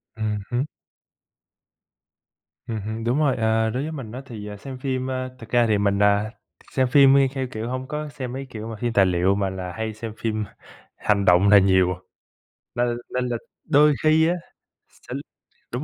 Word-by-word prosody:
Ừm 110 -1 -1
hứm. 120 +2 +1 2.0
Ừm 115 -3 -4
hưm, 110 +2 -5
đúng 120 +5 +1
rồi, 145 -4 +3
à, 110 -1 +2
đối 125 +5 -2
với 155 - -4
mình 130 -8 -7
á 125 +3 -6
thì, 110 -5 -8
à, 105 0 -7
xem 130 +5 -8
phim, 130 -1 -2
ơ, 130 -1 -4
thực 115 -2 -11
ra 120 0 +4
thì 105 -2 +3
mình, 100 -1 +1
à, 105 +1 +3 0.4
xem 130 -1 +2
phim 135 +1 +6
đi 135 -1 +5
theo, 135 -2 -2
kiểu, 110 0 -4
hông 130 +1 -4
có 150 +1 -4
xem 130 -3 -6
mấy, 135 +1 -5
kiểu, 110 -2 -7
mà 115 - -5
phim 120 +2 -2
tài 100 -3 +5
liệu 90 +1 +2
mà 100 -1 0
là 95 -1 -5
hay 110 +3 -3
xem 110 0 -7
phim 110 -1 -1 0.5
hành 100 -2 +1
động 90 +2 +5
là 105 - +9
nhiều 95 -1 +3
à, - - -9 0.8
nên 120 0 0 0.2
nên 125 0 0
là 120 - -1 0.3
đôi 150 0 +5
khi 155 +1 +5
á, 175 - +2 0.5
sẽ - - -12 0.6
đúng 125 +4 -2
115 Hz, 200 wpm, -23 LUFS, 105-130 Hz, 2.0 s, là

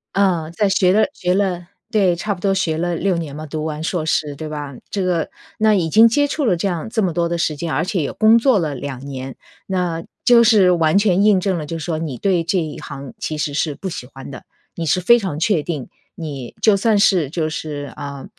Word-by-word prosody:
呃， 180 -5 +1
在 205 +5 +1
学 185 -1 +3
了 215 +3 +3
学 180 0 -1
了 185 -3 -1 0.2
对， 190 -5 +2
差 205 +4 -2
不 190 - -11
多 195 -1 +2
学 170 -5 0
了 175 +1 -1
6 185 +1 0
年 155 -4 -5
嘛， 155 +1 -6
读 155 +1 -5
完 155 0 -4
硕 165 -1 -2
士， 150 -2 0
对 155 +2 -6
吧？ 145 -3 -6
这 200 - -2
个 175 -3 0 0.3
那 215 -1 +4
已 170 -4 0
经 225 +7 +7
接 285 +6 +2
触 285 +1 -2
了 200 -7 +3
这 170 - -3
样 175 -1 -3
这 220 -1 0
么 185 - +1
多 170 +1 0
的 170 0 -2
时 160 -2 0
间， 165 -1 -3
而 150 +4 +1
且 185 0 -1
也 140 - -2
工 220 +1 +5
作 235 -2 +3
了 155 -4 -2
2 135 0 -6
年， 135 -2 -6 0.3
那 180 -3 -1 0.2
就 240 -1 +6
是 210 -6 +5
完 165 0 +3
全 200 -2 +3
印 210 -2 +5
证 190 -1 0
了 155 - -4
就 165 +3 -5
说 160 +1 -3
你 155 -6 -4
对 180 0 +1
这 180 +2 +1
一 155 -3 -5
行 140 -3 -8
其 155 - -3
实 145 -1 -2
是 150 0 -1
不 190 - -5
喜 160 -7 -6
欢 135 +1 -11
的。 130 - -9 0.3
你 170 - -3
是 180 +4 +1
非 235 +7 +5
常 190 -9 -4
确 175 -1 +2
定， 150 -7 -5 0.3
你 140 -7 -7
就 215 -3 +4
算 215 +2 +2
是 185 -8 +3
就 155 0 -2
是， 145 -3 -5
呃， 140 -1 -7
170 Hz, 255 characters per minute, -19 LUFS, 150-195 Hz, 0.3 s, 经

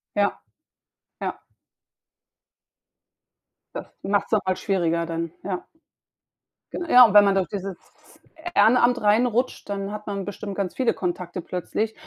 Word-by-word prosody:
Ja, 205 0 +1 0.8
ja. - - -4 2.3
Das - - -6 0.2
macht's 205 +2 0
noch 210 -3 +1
mal 185 - +1
schwieriger 170 -4 0
dann, 165 0 -3
ja. 185 -2 -4 1.1
Gen 345 - -4
ja, 245 -6 +8
wenn 205 0 +9
man 200 -1 +3
durch 190 -2 +1
dieses 195 -2 -5 0.8
Ehrenamt 245 +1 +4
reinrutscht, 235 +3 +1
dann 200 0 -3
hat 210 0 -7
man 200 -2 -3
bestimmt 205 0 -6
ganz 190 -3 -2
viele 255 -3 +1
Kontakte 180 0 -4
plötzlich, 195 +6 -3
200 Hz, 125 wpm, -24 LUFS, 185-215 Hz, 2.3 s, wenn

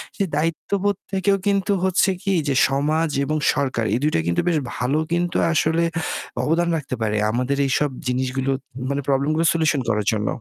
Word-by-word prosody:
সেই 195 -2 0
দায়িত্ববোধ 190 +5 0 0.2
থেকেও 195 +1 +2
কিন্তু 200 0 +2
হচ্ছে 190 +1 +3
কি 195 -1 +1
যে 135 - +1
সমাজ 155 +4 +1 0.2
এবং 155 +1 -1 0.2
সরকার 130 -5 -1
এই - - +3
২ 155 - +2
টা - - +3
কিন্তু 85 - +1
বেশ 165 -3 +3 0.2
ভালো 130 +5 0
কিন্তু 175 0 0 0.2
আসলে 160 +2 +2 0.6
অবদান 170 +2 +1
রাখতে 135 -3 -4
পারে 105 -1 0 0.2
আমাদের 125 +4 -1
এইসব 140 +2 +1 0.2
জিনিসগুলো 130 +1 -1 0.4
মানে 140 0 -1
প্রবলেম 140 +1 +1
গুলো 165 +1 +1
সলিউশন 155 -4 +1
করার 105 -2 0
জন্য। 105 -1 -1
150 Hz, 175 wpm, -22 LUFS, 130-170 Hz, 0.6 s, হচ্ছে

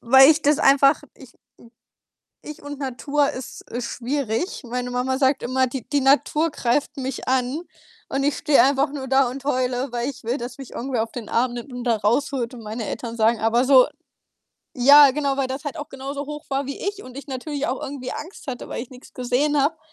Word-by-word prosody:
weil 265 +4 +7
ich 315 0 +2
das 295 0 +3
einfach 275 +2 +5
Ich, 260 -3 -15
hm - - -33 1.1
ich 300 - -9
und 290 0 -7
Natur 280 +2 0
ist, 255 -1 -7
äh, 240 - -3
schwierig. 250 - -3
Meine 245 +1 -4
Mama 255 +1 -1
sagt 270 0 +2
immer, 260 +2 +1
die 255 -1 -6
die 290 -2 +1
Natur 295 +4 +3
greift 285 +2 -1
mich 265 -1 -4
an, 260 +4 0 0.5
und 275 0 -1
ich 290 - +1
stehe 300 -3 +4
einfach 275 +1 +2
nur 275 -2 -6
da 265 -1 +3
und 270 +2 -8
heule, 255 -1 0
weil 240 +2 -1
ich 275 -3 -10
will, 240 +3 0
dass 245 0 -7
mich 270 -3 -10
irgendwer 245 -3 -2
auf 225 - -10
den 235 -4 -7
Arm 240 +1 +1
nimmt 245 +3 -7
und 245 0 -6
da 235 - +3
rausholt 235 +4 0
und 240 - -9
meine 220 +1 -5
Eltern 230 0 -5
sagen, 225 0 +2
aber 230 +2 +2
so 260 -1 +6 0.9
ja, 285 +3 +9
genau, 280 0 -1
weil 270 -1 0
das 265 +3 -6
halt 290 - -4
auch 295 - -7
genauso 275 +2 -6
hoch 300 +1 -7
war 275 0 -1
wie 280 - -5
ich 405 0 -4
und 255 +1 -11
ich 280 - -9
natürlich 285 +2 -4
auch 260 - -3
irgendwie 260 -2 -5
Angst 340 +1 -9
hatte, 255 -2 -6
weil - - -4
ich 240 - -9
nix 255 0 -14
gesehen 265 +4 +1
habe. 310 +4 +1
265 Hz, 215 wpm, -23 LUFS, 245-285 Hz, 1.1 s, ja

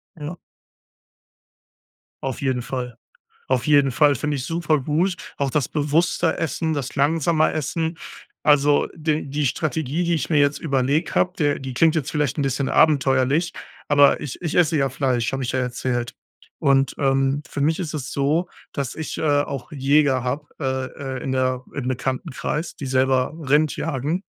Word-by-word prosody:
Ja. 155 +1 -6 1.9
Auf 135 -2 -3
jeden 130 -3 0
Fall. 125 -1 -5 0.5
Auf 130 -2 +1
jeden 145 -2 +4
Fall, 145 +3 +4
finde 145 +3 -2
ich 130 - -4
super 165 -3 +1
gut, 165 +7 0 0.2
auch 140 -1 -1
das 145 -1 0
bewusste 160 +3 +1
Essen, 160 +1 -1
das 140 -4 -3
langsame 155 +2 +2
Essen. 160 +2 -2 0.4
Also 145 -1 +4
d 155 -2 -1
die 145 +1 -1
Strategie, 155 +3 -1
die 170 0 +1
ich 155 -1 -2
mir 155 - +4
jetzt 145 0 +3
überlegt 140 +2 0
hab, 180 0 +1
der 145 -3 +1
die 135 -1 -6
klingt 160 +5 +4
jetzt 155 -5 -1
vielleicht 150 -1 -1
'n - - +2
bisschen 135 0 -1
abenteuerlich, 140 +2 +3 0.4
aber 145 -1 +5
ich 145 - -6
ich 165 -3 -3
esse 165 -2 +4
ja 135 -1 +2
Fleisch, 130 -3 0
hab 135 0 -2
ich 130 - -2
ja 130 - 0
erzählt 125 -1 -2 0.4
und 135 -1 +2
ähm, 135 +1 +1
für 145 - -5
mich 155 +3 +2
ist 175 -5 -4
es 140 -4 -4
so, 150 +6 +1 0.2
dass 140 -4 -3
ich 160 - -5
äh, - - -3 0.2
auch 140 -4 -6
Jäger 140 -2 +2
hab, 145 +4 -3
äh, 130 -2 -1 0.3
äh, - - -8
in 135 - -2
der 130 -1 0
im 135 -3 -4
Bekanntenkreis, 130 +5 -3
die 140 - -6
selber 130 0 +2 0.2
Rind 150 +2 +3
jagen 155 +4 -2
145 Hz, 170 wpm, -22 LUFS, 130-155 Hz, 1.9 s, aber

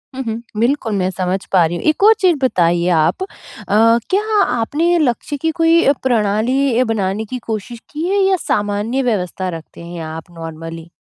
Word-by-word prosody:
हुँ, 265 - -3
हुँ, 225 -1 -4 0.2
बिल्कुल, 235 0 0
मैं 185 -1 0
समझ 185 0 -1
पा 180 -3 +5
रही 165 +2 -2
हूँ। - - -7
एक 310 - 0
और 435 +2 +8
चीज़ 360 -4 +3
बताइए 175 -7 +2
आप 165 - +1
अ, - - -5 0.8
क्या 400 +3 +1 0.2
आपने 290 +9 +1
लक्ष्य 290 0 -1
की 320 +3 -1
कोई 330 +1 +4 0.2
प्रणाली 240 +2 +1
अ, - - +4
बनाने 215 -2 -1
की 250 +4 -5
कोशिश 225 +2 -5
की 310 +3 -3
है 400 +1 +2
या 385 0 +3
सामान्य 205 +5 0
व्यवस्था 190 -5 -2
रखते 160 - -14
हैं 170 0 -7
आप 160 +2 -8
नॉर्मली? 165 0 -8
225 Hz, 180 wpm, -17 LUFS, 180-280 Hz, 0.8 s, और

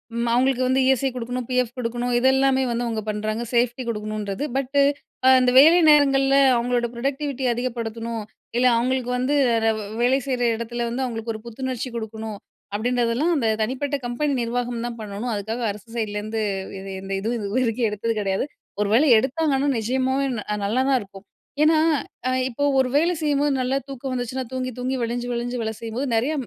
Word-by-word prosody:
ம் 235 0 -1
அவுங்களுக்கு 255 +1 +2
வந்து 260 +1 +2
இ-எஸ்-ஐ 265 0 +3
குடுக்கணும். 245 0 -4
பி-எஃப் 250 -2 0
குடுக்கணும். 245 0 -2
இதெல்லாமே 265 +1 +3
வந்து 235 +1 -1
அவுங்க 225 -2 -2
பண்றாங்க. 215 +2 -2
சேஃப்டி 245 +1 +1
குடுக்கணுன்றது. 210 0 -3
பட்டு 275 +1 +1 0.6
அந்த 250 -1 +3
வேலை 325 +5 +8
நேரங்கள்ல 275 -2 +5 0.2
அவுங்களோட 240 0 0
பரொடெக்டிவிட்டிய 270 +1 -2
அதிகப்படுத்தணும். 230 -2 -4 0.3
இல்ல 250 +1 +4
அவுங்களுக்கு 250 +1 0
வந்து 255 +4 0 0.3
ரவ் 220 -1 +1 0.2
வேலை 255 +3 +3
செய்ற 255 -2 -1
எடத்ல 235 +1 -4
வந்து 250 +3 -2
அவுங்களுக்கு 225 -2 -4
ஒரு 215 - -8
புத்துணர்ச்சி 255 +1 -4
குடுக்கணும். 220 -1 -5 0.4
அப்படின்றதெல்லாம் 245 +7 +1
அந்த 230 -5 +1
தனிப்பட்ட 265 +5 -1
கம்பெனி 275 +4 -1
நிர்வாகம் 240 0 -2
தான் 235 -1 -6
பண்ணணும். 215 +3 -4
அதுக்காக 220 +4 -4
அரசு 210 +2 -12
சைட்லருந்து 215 0 -2 0.4
எது 195 0 -8
எந்த 195 0 -5
இதுவும் 230 +4 -2
இதுவரைக்கும் 225 +2 0
எடுத்தது 210 +2 -2
கிடையாது. 195 +5 0 0.4
ஒரு 210 - +1
வேளை 275 +7 +5
எடுத்தாங்கன்னா 280 +3 +1
நிஜமாவே 260 +4 0
ந - - -3
அ - - 0
நல்லா 225 +6 +1
தான் 265 - +4
இருக்கும். 195 0 -13 0.4
ஏன்னா, 315 +1 +5 0.5
அ - - +1 0.2
இப்போ 260 +4 -3 0.2
ஒரு 260 -1 +2
வேலை 335 +4 +3
செய்யும்போது 290 -1 +1
நல்லா 260 +2 0
தூக்கம் 270 -1 -6
வந்துச்சுன்னா, 250 +1 -3
தூங்கி 255 0 -3
தூங்கி, 255 +1 -1
வழிஞ்சு 240 +1 -2
வழிஞ்சு 240 +1 -3
வேல 220 0 -2
செய்யும்போது 230 +4 -3
நெறைய 255 +8 +1
245 Hz, 165 wpm, -23 LUFS, 225-265 Hz, 0.6 s, வேலை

